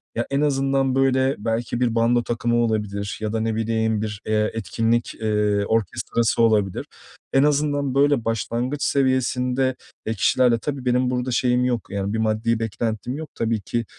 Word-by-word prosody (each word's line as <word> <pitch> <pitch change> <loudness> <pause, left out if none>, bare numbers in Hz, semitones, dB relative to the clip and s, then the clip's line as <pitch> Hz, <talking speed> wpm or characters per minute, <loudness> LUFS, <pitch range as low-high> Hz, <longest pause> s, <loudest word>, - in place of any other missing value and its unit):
Ya, 120 - -1
en 140 +1 +1
azından, 135 -2 +1
böyle, 135 0 +2
belki 115 +2 -2
bir 120 -2 +1
bando 120 +1 +3
takımı 120 0 -1
olabilir 105 -3 -1
ya 110 0 -2
da 110 - 0
ne 110 0 -1
bileyim, 110 -1 0
bir, 105 -1 -4
eee, 110 0 +1
etkinlik, 115 +3 -1
eee, 105 -2 0
orkestrası 115 +2 0
olabilir. 105 -5 +2 0.5
En 135 - +5
azından, 145 -2 +1
böyle, 140 -3 +3
başlangıç 120 +5 -2
seviyesinde, 130 -1 +1 0.3
eee, 110 - -1
kişilerle 115 +2 +3
Tabii 140 -3 -4
benim 125 0 +2
burada 125 0 -1
şeyim 125 0 +2
yok, 120 -4 -1
yani, 100 0 -2
bir - - 0
maddi 110 +1 +1
beklentim 115 +2 -3
yok 160 0 -7
tabii 115 -2 -1
ki, 115 +4 -2
115 Hz, 165 wpm, -23 LUFS, 110-130 Hz, 0.5 s, En